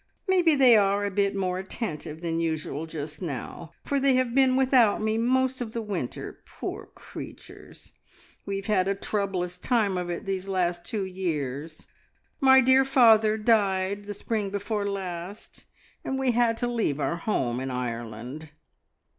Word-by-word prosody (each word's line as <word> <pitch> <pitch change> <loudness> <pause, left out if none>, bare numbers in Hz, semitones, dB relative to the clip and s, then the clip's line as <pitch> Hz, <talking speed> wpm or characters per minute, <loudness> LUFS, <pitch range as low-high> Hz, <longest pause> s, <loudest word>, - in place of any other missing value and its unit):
Maybe 355 -4 +4
they 260 -4 +7
are 200 -1 +3
a 200 - -2
bit 200 0 +1
more 185 -2 -1
attentive 165 -6 -6
than 165 -1 -2
usual 160 -1 -2
just 150 0 -6
now, 160 +1 -6
for 280 - 0
they 270 -1 +3
have 255 -2 +1
been 260 -1 +4
without 255 -5 +4
me 215 0 0
most 260 +2 +1
of 225 -2 -5
the 230 - -2
winter, 190 - -5
poor - - -7
creatures! - - -11 0.5
We 200 - -4
have 195 0 -5
had 195 -3 +2
a 195 - +1
troublous 190 -3 -2
time 205 -5 +1
of 175 -1 -4
it 175 +5 -4
these 195 -1 -3
last 175 -2 -1
two 205 -3 -3
years. 160 -5 -4 0.5
My 265 -2 +7
dear 260 +1 +5
father 225 -5 +5
died 200 -3 +1
the 205 0 -6
spring 210 -1 -2
before 200 +1 -2
last, 190 0 -6 0.4
and 265 - -2
we 265 -1 +2
had 235 -1 +2
to 245 - -1
leave 225 -12 -1
our 170 +3 -1
home 130 - -1
in 130 +1 -4
Ireland. 120 +4 -5
200 Hz, 165 wpm, -26 LUFS, 170-230 Hz, 0.5 s, they